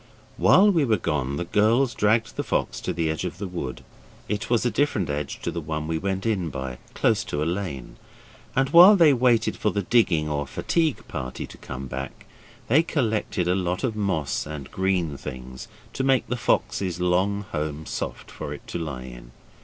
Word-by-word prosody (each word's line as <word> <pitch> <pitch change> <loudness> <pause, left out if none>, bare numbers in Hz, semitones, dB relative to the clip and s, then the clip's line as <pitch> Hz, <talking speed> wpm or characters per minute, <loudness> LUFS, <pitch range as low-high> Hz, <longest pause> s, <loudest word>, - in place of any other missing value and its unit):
While 205 +2 +6
we 165 -6 +2
were 115 -5 +2
gone 75 -6 -1
the 85 - -2
girls 115 +7 +3
dragged 110 +1 +1
the - - -2
fox - - -1
to - - -2
the 85 -1 -1
edge 80 +2 -2
of 90 -2 -4
the 100 - -4
wood; 85 -8 -5 0.4
it 105 0 -3
was 120 0 +2
a 120 - +2
different 105 - 0
edge 70 -1 -4
to - - -1
the 85 - -4
one 75 0 -4
we 80 0 -1
went 95 +2 -2
in 95 -7 0
by 65 -3 -5 0.2
close - - +2
to 75 +1 -2
a - - -1
lane 85 -9 -4 0.6
and 135 0 +2
while 180 +5 +10
they 165 -6 +6
waited 120 -3 +2
for 105 - 0
the 100 -1 -1
digging 90 -10 +3
or 75 -1 -2
fatigue 160 - -1
party 65 -5 -5
to - - -13
come 65 +1 -7
back, 65 +1 -7 0.4
they 140 +7 +5
collected 110 - -1
a 90 - +3
lot 90 -1 -1
of 120 -4 0
moss 90 -10 -1
and 75 -3 -7
green 90 -6 0
things 65 -1 -8 0.3
to 130 - -2
make 135 -2 +3
the 125 - -2
fox's 95 -6 0
long 95 +3 +1
home 75 -1 -3
soft - - -5
for - - -6
it - - -14
to - - -3
lie 75 -6 -5
in. - - -11
90 Hz, 200 wpm, -25 LUFS, 75-115 Hz, 0.6 s, while